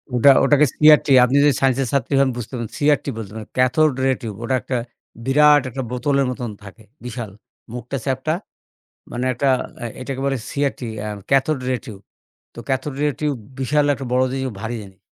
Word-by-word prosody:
ওটা 130 +4 +6
ওটাকে 145 +2 +5
CRT 150 0 +6 0.2
আপনি 130 +3 +2
যদি 145 -2 +5
স্যাইন্স 135 -2 +2
এর 130 - -3
ছাত্রী 140 0 0
হন, 135 -1 +3
বুঝতেন। 120 +2 -6 0.2
CRT 145 -2 +2
বলতেন। 110 -1 -7 0.2
Cathode 130 +4 +3
ray 135 - +3
tube. 110 -3 -6
ওটা 130 +3 0
একটা 130 - -2 0.5
বিরাট 145 +2 +5
একটা 135 +2 -5
বোতলের 135 +2 +1
মতন 120 -2 -5
থাকে। 105 +2 -13 0.2
বিশাল। 115 -3 -6 0.4
মুখটা 125 +2 -5
চ্যাপ্টা। 135 +3 -1 0.8
মানে 125 +1 -3
একটা 130 +3 0 0.3
আ - - -3 0.2
এটাকে 130 +1 -5
বলে 135 - 0
CRT, 140 -2 -2 0.2
অ্যা 105 - -4 0.2
ক্যাথড 135 +2 +2
রে 130 - +1
টিউব। 105 -4 -10 0.5
তো - - -13
ক্যাথড 135 +1 -2
রে 150 - +3
টিউব, 150 -2 0 0.2
বিশাল 145 +3 +2
একটা 135 - -7
বড় 130 +1 +3
জিনিস, 135 0 -2
ও - - -10
ভারী 115 +1 -4
জিনিস। 95 -2 -15
130 Hz, 180 wpm, -21 LUFS, 120-140 Hz, 0.8 s, ওটা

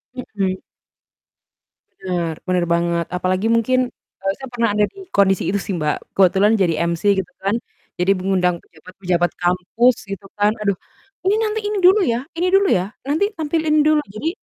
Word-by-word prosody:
Mhm. 195 -6 -3 1.4
Bener 175 -4 -2
bener 180 -1 +1
banget, 170 0 0
apalagi 185 +4 0
mungkin, 255 +3 +2 0.4
eee, 195 0 +1
saya 265 - -8
pernah 235 -2 +1
ada 210 0 +3
di 395 - -14 0.2
kondisi 195 -2 +3
itu 200 +1 0
sih, 195 - -3
Mbak, 150 -1 -3
kebetulan 195 +2 +4
jadi 170 -3 +3 0.2
MC 170 +2 -4 0.2
gitu 185 - -5
kan, 200 +3 +1 0.4
jadi 185 +2 +3
mengundang 180 -2 +1
pejabat-pejabat 175 +1 -2
kampus, 185 +8 +2
gitu 195 0 -7
kan, 205 +1 +4
aduh, 200 -3 +1 0.5
"Ini 410 - +4
nanti, 435 0 -1
ini 420 -1 -1
dulu 380 +4 +7
ya 235 0 +1 0.2
ini 360 - +2
dulu 395 0 +4
ya, 180 0 +2 0.2
nanti 310 +8 +2
tampil 320 0 -1
ini 305 0 +4
dulu." 305 -1 +4
Jadi 310 +9 -1
195 Hz, 165 wpm, -20 LUFS, 180-255 Hz, 1.4 s, dulu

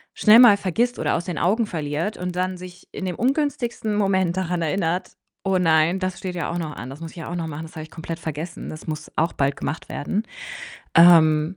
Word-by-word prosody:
schnell 215 +1 +7
mal 220 -5 +8
vergisst 235 +7 -1
oder - - +1
aus 170 - -2
den 180 -3 -4
Augen 215 +6 +2
verliert 160 +2 -3
und 180 0 -4
dann 185 +1 -1
sich 180 0 -12
in 190 - -5
dem 180 -2 -3
ungünstigsten 250 - -1
Moment 190 -3 +1
daran 180 -2 -1
erinnert: 170 +2 -1 0.3
„Oh 195 -1 +1
nein, 165 0 +3
das 185 -1 -3
steht 185 -1 -5
ja 170 - -2
auch 170 - -3
noch 155 -3 -5
an. 125 - -7
Das 135 - -10
muss 165 -1 -7
ich - - -17
ja 165 - -6
auch - - -3
noch 165 -2 -3
machen. 155 0 -6
Das 160 - -12
habe 160 - -5
ich 155 - -12
komplett 165 0 -6
vergessen. 160 +2 -6
Das 155 - -9
muss 155 -1 -5
auch 165 +2 +1
bald 140 0 0
gemacht 155 - -5
werden.“ 195 +8 -2 0.8
Ähm, 165 0 +6
175 Hz, 230 wpm, -23 LUFS, 160-190 Hz, 0.8 s, mal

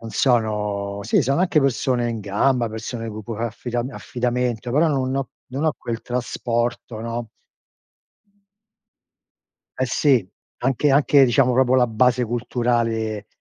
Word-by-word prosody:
non 115 -1 -8
sono 105 -4 0
sì 205 - +2
sono 135 +6 +1
anche 175 -5 +3
persone 125 -2 +1
in 115 - -4
gamba, 115 +5 +1
persone 115 +1 -5
con 110 +1 -7
cui 115 +1 -6
a - - -9
fa 120 - 0
affida 120 +2 -3
affidamento, 125 -2 -2
però 155 +5 +4
non 130 -3 0
ho 135 -2 -3 0.2
non 140 +4 -2
ho 155 - +3
quel 115 -1 -5
trasporto, 120 -2 -2
no? 115 0 -4 2.5
Eh 130 - +1
sì, 130 -3 +2 0.3
anche 135 +3 +1
anche 140 0 +5
diciamo 125 +1 +3
proprio 130 0 +3
la 125 -1 +5
base 125 +2 +2
culturale, 115 -2 -1
120 Hz, 145 wpm, -22 LUFS, 115-130 Hz, 2.5 s, anche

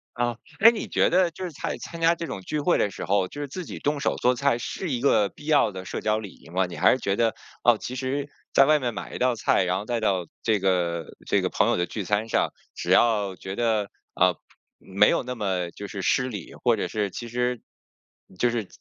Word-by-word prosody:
啊， 120 -1 -1 0.2
诶， 225 +3 +9
你 230 - -5
觉 - - +2
得 180 -1 +3
就 175 - -8
是 180 - -4
在 - - -4
参 170 - -8
加 165 0 +4
这 170 0 -5
种 130 - -5
聚 150 +10 -3
会 175 +4 +2
的 100 - +1
时 - - -7
候， 100 -1 +1
就 145 - -8
是 145 - -3
自 175 +5 -6
己 - - -7
动 145 0 -1
手 140 - 0
做 125 +1 +2
菜， 135 -1 +1
是 175 +7 -4
一 125 -2 -1
个 105 -7 +4
必 150 - -15
要 150 -8 +4
的 95 -1 -8
社 - - -4
交 110 0 +1
礼 105 -3 -7
仪 - - -18
吗？ 95 0 +1
你 85 - -8
还 - - +5
是 130 - +1
觉 100 -4 0
得， 115 0 +2 0.3
哦， 120 -2 +5
其 125 - -5
实 135 +3 -2 0.2
在 135 - +7
外 155 +1 +5
面 120 -4 -2
买 - - -7
一 - - -3
道 125 0 +2
菜， 110 - +2
然 90 0 0
后 105 - -7
带 120 0 -1
到 95 -6 0 0.2
这 110 -3 +2
个 85 -3 0 0.2
这 - - +2
个 - - 0
朋 - - +2
友 - - +2
的 90 0 0
聚 105 - -4
餐 105 +4 0
上， - - +2 0.3
只 - - -3
要 105 -5 +3
觉 95 +1 -7
得， 110 -4 +1 0.2
啊， 90 -1 +3 0.4
没 100 +2 +3
有 - - +1
那 125 0 -4
么 95 -6 -2
就 100 - -8
是 100 -2 -6
失 125 +6 +2
礼， 105 -8 -7
或 - - +4
者 - - -2
是 105 -2 -1
其 120 +6 -7
实 125 0 -1 0.8
就 120 +3 +2
是 115 -4 -2
115 Hz, 270 characters per minute, -25 LUFS, 100-135 Hz, 0.8 s, 诶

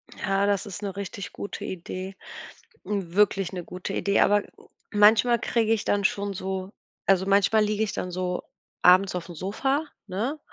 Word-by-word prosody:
Ja, 195 0 0
das 200 -2 +1
ist 200 0 -7
'ne 200 -1 -4
richtig 200 0 -6
gute 200 - -6
Idee, 185 +2 -6 0.7
wirklich 195 -1 +1
'ne 180 -2 -4
gute 180 +2 -6
Idee. 200 0 +2
Aber 205 0 +4 0.5
manchmal 220 +3 +5
kriege 225 -1 +1
ich 220 - -2
dann 205 0 +1
schon 200 +1 0
so 190 0 -4 0.3
also 190 -1 +3
manchmal 200 +2 +4
liege 210 +1 0
ich 215 - -2
dann 180 - -4
so 180 0 -2 0.4
abends 185 +2 +6
aufm 175 -1 -5
Sofa, 270 - -1 0.2
ne? 225 +11 -2
200 Hz, 160 wpm, -26 LUFS, 185-210 Hz, 0.7 s, abends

